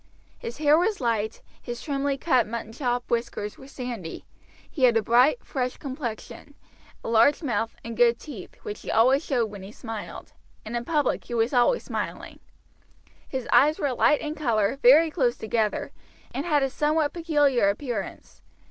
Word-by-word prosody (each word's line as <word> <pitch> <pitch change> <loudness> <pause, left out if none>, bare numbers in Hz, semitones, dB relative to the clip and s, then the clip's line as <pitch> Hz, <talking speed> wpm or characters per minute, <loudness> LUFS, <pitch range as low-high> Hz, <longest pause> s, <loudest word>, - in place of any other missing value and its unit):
His 235 - -7
hair 300 +1 +4
was 405 +3 0
light, 225 -4 -1 0.2
his 240 -1 -6
trimly 280 -1 -1
cut 255 -8 +2
muttonchop 235 +2 -3
whiskers 230 -3 -3
were 265 - -12
sandy, 245 -11 -7 0.4
he 265 -5 +1
had 235 -2 +4
a 225 - +1
bright, 250 - +3
fresh 255 -2 -3
complexion, 260 -5 -7 0.5
a - - -6
large 230 +8 +4
mouth, 230 -4 -1
and 230 0 -5
good 235 0 +4
teeth, 240 - -10
which 210 - -6
he - - -8
always 260 +6 +4
showed 240 -8 0
when 200 -2 -9
he 195 +2 -9
smiled, 225 -2 -8 0.3
and 225 +2 -5
in 240 0 -3
public 295 -3 0
he 240 - -5
was 230 +3 +1
always 255 - +3
smiling; - - -5 0.9
his 260 -3 -4
eyes 285 +6 +5
were 280 -3 -1
light 295 +4 +3
in 305 -1 -3
color, 235 -5 0
very 305 +6 +6
close 245 -4 +1
together, 220 -1 -1 0.4
and 280 +6 -3
had 295 -4 +3
a 270 - -1
somewhat 300 +1 +1
peculiar 290 - +2
appearance. 215 -2 -5
245 Hz, 165 wpm, -25 LUFS, 230-290 Hz, 0.9 s, very